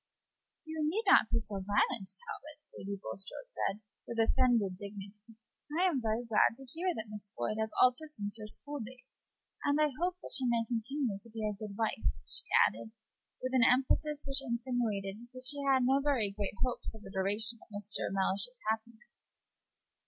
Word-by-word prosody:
"You 315 0 -5
need 335 +9 +1
not 385 - +7
be - - +2
so 210 -3 -3
violent, 195 0 +1
Talbot," 420 -11 -9 0.2
Lady 200 +1 -4
Bulstrode - - -5
said 205 +2 -1 0.3
with 235 - -5
offended 225 -4 +3
dignity. 205 +2 -10 0.4
"I 370 - +5
am 315 -9 +2
very 225 +1 0
glad 225 0 +4
to 270 - -10
hear 335 +8 -1
that 220 - -4
Miss 210 -1 -5
Floyd 120 - -1
has 220 0 0
altered 255 +5 +4
since 205 -7 -4
her 215 - -5
school 290 +6 -4
days, 250 +2 -11 0.4
and 285 +1 +3
I 305 -1 +5
hope 360 0 +1
that - - -6
she 260 -2 +4
may 235 -1 +2
continue 235 -1 -1
to 230 - -10
be 220 -1 -3
a 210 - -1
good 205 -1 -7
wife," 215 - +1 0.2
she - - -3 0.2
added, 115 - -7 0.5
with 255 0 -1
an 260 - +5
emphasis 280 +4 +3
which 275 0 0
expressed 235 -4 -2
that 255 0 -7
she 285 +1 +3
had 270 -2 +4
no 270 +2 +4
very 265 -8 +2
great 200 0 -3
hopes 245 -2 -3
of 215 - -12
the 195 - -10
continuance 205 +4 +1
of 230 - -19
Mr. 205 0 -3
Mellish's 195 +5 0
happiness. 225 +1 -8
230 Hz, 180 wpm, -33 LUFS, 205-270 Hz, 0.5 s, not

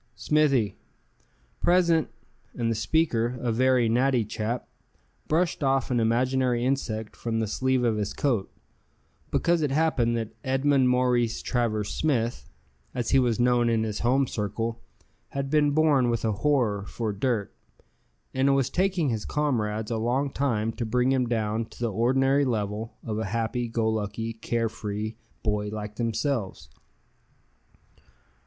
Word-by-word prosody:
"Smithy." 140 -10 +1 0.8
"Present," 170 -3 +3 0.5
and 115 -1 0
the - - 0
speaker, 120 +1 +1
a 120 -1 -1
very 125 0 +3
natty 125 0 +2
chap, 110 +3 -3 0.6
brushed 165 0 +1
off 135 -1 +1
an 120 - +2
imaginary 125 +1 +1
insect 110 -5 -2
from 115 -1 -2
the 110 - +1
sleeve 130 +4 0
of 115 -3 +1
his 105 -1 -2
coat; 120 -9 -1 0.8
because 170 -1 +2
it 150 - +1
happened 135 -6 +1
that 110 -1 -4
Edmund 135 0 +2
Maurice 125 -2 +1
Travers 110 -4 0
Smith, 120 -6 -1 0.5
as 120 -2 -2
he 135 - +5
was 120 -2 +1
known 120 -1 +3
in 115 -1 +2
his 105 -2 -3
home 130 +3 +2
circle, 115 +1 -3 0.6
had 135 0 -2
been 150 -1 +4
born 145 -4 +3
with 115 -1 -1
a 110 - +2
horror 110 -3 +1
for 110 -3 -3
dirt: 105 0 -1 0.8
and 130 +1 +2
it - - +4
was 135 -2 +1
taking 185 -5 +1
his 110 -3 -2
comrades 110 -7 -1
a 115 - 0
long 130 +5 0
time 115 -6 0
to 120 - -5
bring 125 +3 +1
him 130 -2 +1
down 110 -1 -1
to - - -17
the 120 -3 -1
ordinary 135 +5 +3
level 110 -3 -2
of 110 -1 -3
a 110 - -2
happy 115 +4 -1
go 115 -1 -1
lucky, 110 +1 -2
care 115 0 -1
free 105 0 -4 0.3
boy 105 -2 0
like 105 0 -6
themselves. 115 - -2
120 Hz, 150 wpm, -26 LUFS, 110-135 Hz, 0.8 s, he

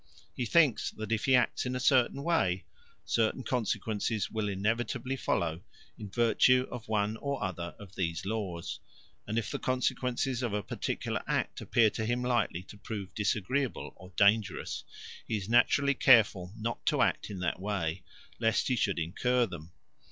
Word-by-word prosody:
He 125 - -2
thinks 150 -4 +4
that 110 0 -7
if 110 -1 0
he 130 - +5
acts 125 - +2
in 125 - -2
a - - -1
certain 130 +1 +3
way, 95 - +1 0.4
certain 115 +3 +1
consequences 110 -3 -1
will 110 -2 -1
inevitably 115 +6 -1
follow 85 -9 -1 0.3
in 105 -3 -8
virtue 120 +4 +4
of 120 -2 -7
one 105 0 0
or 140 -3 -3
other 85 -3 -4
of 100 -3 -12
these 85 -3 -2
laws; 95 -5 -3 0.5
and 110 - -2
if 115 - -1
the - - -3
consequences 130 0 0
of 120 -4 -2
a 105 -1 -1
particular - - -3
act - - -1
appear 115 -3 +3
to 110 - -3
him 120 +1 0
likely 120 -8 0
to 105 - -13
prove 100 -4 -6
disagreeable 115 +6 -1
or 95 0 -14
dangerous, 105 0 +2 0.4
he 110 - 0
is 100 -2 -6
naturally 125 +4 +4
careful 105 -9 +5
not 115 +2 -3
to - - +4
act - - 0
in 100 - -6
that 85 0 -1
way 95 -4 -2 0.4
lest 115 +1 +1
he 130 - +2
should 100 -4 0
incur 120 +9 +1
them. 85 -5 -9
110 Hz, 165 wpm, -30 LUFS, 100-125 Hz, 0.5 s, he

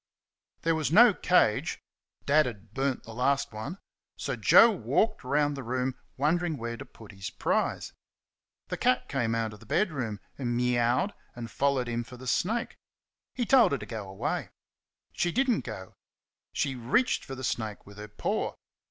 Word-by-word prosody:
There 165 - +3
was 155 -2 -1
no 225 +4 +8
cage 180 -13 +2 0.5
Dad 150 +1 +4
had 110 -3 -9
burnt 135 -1 -1
the 115 - -10
last 135 +2 0
one 110 - -5 0.4
so - - -3
Joe 230 - +7
walked 215 +2 0
round 145 +2 +1
the 135 - -5
room 130 +1 -1 0.2
wondering 160 +3 +1
where 115 -1 -4
to - - -9
put 110 -3 -14
his 95 -2 -6
prize. - - -1 0.8
The - - -3
cat 125 - +2
came 120 -5 0
out 115 -2 -1
of 105 - -12
the - - -16
bedroom 130 - -1 0.2
and 120 -3 -1
mewed 125 - +2 0.2
and 115 -2 -7
followed 140 -3 +1
him 120 0 -2
for 125 +2 -12
the 130 - -11
snake. 225 - -1 0.6
He 245 - 0
told 250 - +5
her - - +1
to 105 - -8
go 105 -2 -6
away. 95 - -3 0.6
She 175 - 0
did 265 +8 +1
n't 225 - 0
go. 95 -5 -7 0.6
She 140 -2 -1
reached 130 - +1
for 135 - -7
the 130 - -8
snake 110 -3 -3
with 100 +1 -13
her 105 - -7
paw. 105 - -2
130 Hz, 175 wpm, -28 LUFS, 115-155 Hz, 0.8 s, no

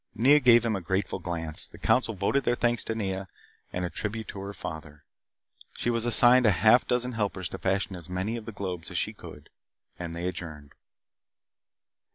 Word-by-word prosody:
Nea 140 +7 +6
gave 120 -3 +6
him 110 -2 +1
a 95 - -3
grateful 95 +2 -2
glance. 80 -3 -3
The - - -14
council 115 -3 +1
voted 100 +9 +1
their 120 - +2
thanks 120 -1 +1
to 115 - -2
Nea 95 -3 -3 0.4
and 90 0 -2
a - - -3
tribute 110 0 -4
to 100 - -7
her 100 +1 -5
father. 80 -5 -8 0.7
She 120 - -1
was 115 0 0
assigned 120 +1 +6
a - - +7
half 110 +6 +4
dozen 125 0 0
helpers 100 -5 -2
to 95 - -7
fashion 95 0 -1
as 90 0 -10
many 95 +5 -2
of 115 -2 -6
the 115 - -6
globes 95 -5 -5
as - - -4
she - - 0
could. - - -12 0.5
They 85 0 -4
adjourned. 80 -6 -7
100 Hz, 190 wpm, -28 LUFS, 90-115 Hz, 0.7 s, a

